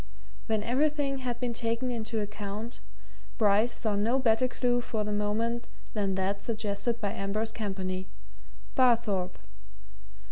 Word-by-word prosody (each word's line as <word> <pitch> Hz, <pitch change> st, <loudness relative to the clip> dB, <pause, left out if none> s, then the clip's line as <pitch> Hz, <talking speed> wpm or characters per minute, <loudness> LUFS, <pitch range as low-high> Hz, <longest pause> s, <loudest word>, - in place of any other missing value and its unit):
When 220 Hz, -2 st, +1 dB
everything 280 Hz, +2 st, +1 dB
had 245 Hz, -2 st, -3 dB
been 245 Hz, -1 st, -1 dB
taken 230 Hz, +2 st, 0 dB
into 225 Hz, -1 st, -2 dB
account, 210 Hz, +2 st, -5 dB, 0.6 s
Bryce 215 Hz, +1 st, +4 dB
saw 215 Hz, -3 st, 0 dB
no 225 Hz, +6 st, +3 dB
better 255 Hz, -1 st, +4 dB
clue 245 Hz, -1 st, +1 dB
for 225 Hz, -3 st, -1 dB
the 210 Hz, 0 st, -2 dB
moment 225 Hz, +3 st, 0 dB, 0.3 s
than 200 Hz, -3 st, +1 dB
that 195 Hz, +1 st, 0 dB
suggested 220 Hz, +1 st, -1 dB
by 205 Hz, -3 st, -1 dB
Ambrose 215 Hz, +2 st, -1 dB
Campany 190 Hz, -4 st, -3 dB, 0.7 s
Barthorpe. 230 Hz, -7 st, +3 dB
220 Hz, 130 wpm, -30 LUFS, 205-240 Hz, 0.7 s, Bryce